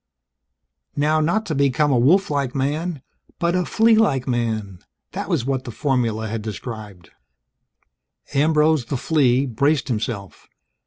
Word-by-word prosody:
Not 155 +1 +2
how 195 +6 +2
to 175 - -4
become 140 +1 +2
a 125 - +3
wolf 185 +10 +3
like 140 -3 -1
man, 150 +3 -2 0.3
but 170 0 0
a 180 -1 +1
flea 225 +1 +4
like 150 - +2
man 110 -6 -2 0.3
that - - -5
was 120 - 0
what 135 -1 -1
the - - -8
formula 115 -4 -1
had 110 +1 -4
described. 105 -4 -8 1.2
Ambrose, 150 -1 +3
the 135 - -3
flea, 135 -2 +2
braced 140 +2 0
himself. 105 -4 -4
135 Hz, 140 wpm, -21 LUFS, 115-155 Hz, 1.2 s, flea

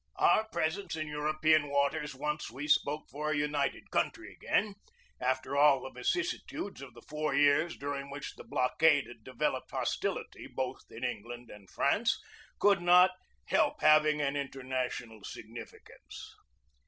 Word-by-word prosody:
Our 220 - +4
presence 170 +1 -2
in 155 -1 -3
European 155 0 +2
waters 140 +1 0
once 150 +2 -3
we 135 +6 -6
spoke 150 0 +2
for 150 +2 -3
a 155 - +1
united 145 -1 -1
country - - -1
again 205 0 0 0.5
after 130 +2 -1
all 140 -2 +5
the 130 - -7
vicissitudes 205 - -3
of 130 -4 -10
the 120 - -14
four 150 0 -2
years 145 +3 +3
during 140 0 -4
which 140 0 -6
the - - -12
blockade 140 +3 +3
had 115 -2 -13
devel 130 0 -1
oped - - -13
hostility - - -3
both 130 -1 -4
in 115 - -9
England 120 0 -5
and 100 -2 -13
France - - +1 0.4
could 200 -3 +4
not 180 +1 +7 0.3
help - - +1
having 155 0 +5
an 140 0 0
international 130 -5 -4
significance. 115 +4 -10
145 Hz, 145 wpm, -31 LUFS, 130-155 Hz, 0.5 s, not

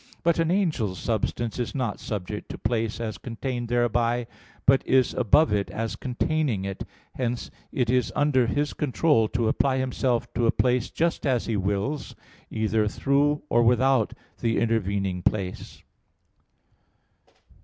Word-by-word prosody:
But 170 0 +2
an 165 -1 +2
angel's 155 - 0
substance 115 +1 -2
is 120 - -3
not 125 -6 -2
subject 105 0 -5
to - - -6
place 115 -2 -1
as 110 -2 -4
contained 120 0 -4
thereby, 120 0 +1 0.4
but 135 +1 +5
is 130 -2 +3
above 130 +4 +4
it 100 -1 0
as 115 0 -3
containing 130 -4 -1
it: 95 -1 -4 0.3
hence 120 -2 -3 0.2
it 125 -3 0
is 125 +1 +1
under 135 -4 +3
his 145 +4 0
control 145 -4 +2
to 120 0 0
apply 130 +4 +2
himself 130 -2 -1
to 120 - +1
a - - +5
place 125 -1 +1
just 170 +1 -1
as 125 -3 +1
he 115 - -1
wills, 100 +9 -2 0.3
either 110 -1 +1
through 140 +6 +1
or 120 - +3
without 125 0 +3 0.3
the 115 -1 0
intervening 100 -5 0
place. 95 -1 -3
120 Hz, 145 wpm, -26 LUFS, 110-135 Hz, 0.4 s, but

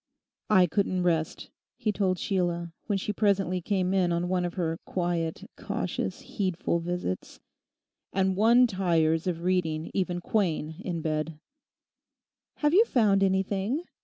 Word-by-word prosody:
'I 190 -4 +6
couldn't 185 0 0
rest,' 165 -3 -1 0.3
he 215 - 0
told 190 -2 0
Sheila, 175 -3 -1
when 205 -3 +1
she 205 +2 -3
presently 195 -3 +1
came 185 0 0
in 185 -2 +2
on 170 +1 0
one 180 -1 +1
of 175 - -4
her 165 -2 -1
quiet, 175 -3 -2
cautious, - - -3
heedful 185 -4 -1
visits; 170 - -4 0.7
'and 190 0 +1
one 235 +5 +6
tires 170 -6 +1
of 170 -2 -2
reading 165 -4 0
even 180 -2 -1
Quain 165 -5 -1
in 170 -3 -3
bed.' 155 0 -2 1.2
'Have 295 0 +1
you 410 +5 +7
found 210 - +3
anything? 195 - +1
185 Hz, 135 wpm, -28 LUFS, 170-195 Hz, 1.2 s, you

